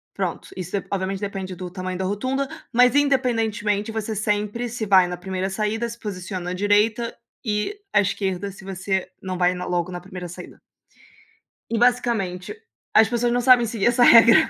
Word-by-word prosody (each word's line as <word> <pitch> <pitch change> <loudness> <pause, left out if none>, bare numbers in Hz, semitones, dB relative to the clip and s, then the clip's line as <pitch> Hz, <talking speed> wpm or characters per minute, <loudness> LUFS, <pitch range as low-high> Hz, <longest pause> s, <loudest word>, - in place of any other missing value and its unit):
Pronto. - - -3
Isso, 190 +2 -3
d - - -12
obviamente 195 0 -2
depende 195 -2 -5
do 180 0 -6
tamanho 185 0 -5
da 190 - -2
rotunda, 260 +8 -1 0.2
mas 250 +2 +5
independentemente, 225 -7 +1
você 220 0 -3
sempre, 210 +3 -1
se 225 -1 -4
vai 190 -3 +5
na 180 0 -5
primeira 190 +1 -3
saída, 215 +4 -1
se 235 - -9
posiciona 185 -3 -5
à - - -2
direita 210 +4 +2 0.3
e 215 - -2
à - - +4
esquerda 195 -1 -1
se 195 0 -12
você 190 0 -2
não 185 -1 -4
vai 180 0 +3
na 180 0 -5
logo 175 0 -1
na 175 - -5
primeira 180 -1 -8
saída. 180 - -10 1.1
E, 230 - 0
basicamente, 235 - +1 0.4
as 220 -1 +6
pessoas 240 0 +1
não 245 - +1
sabem 245 -1 +6
seguir 220 -1 0
essa 245 0 +4
regra. 235 +6 +7
205 Hz, 180 wpm, -23 LUFS, 185-235 Hz, 1.1 s, regra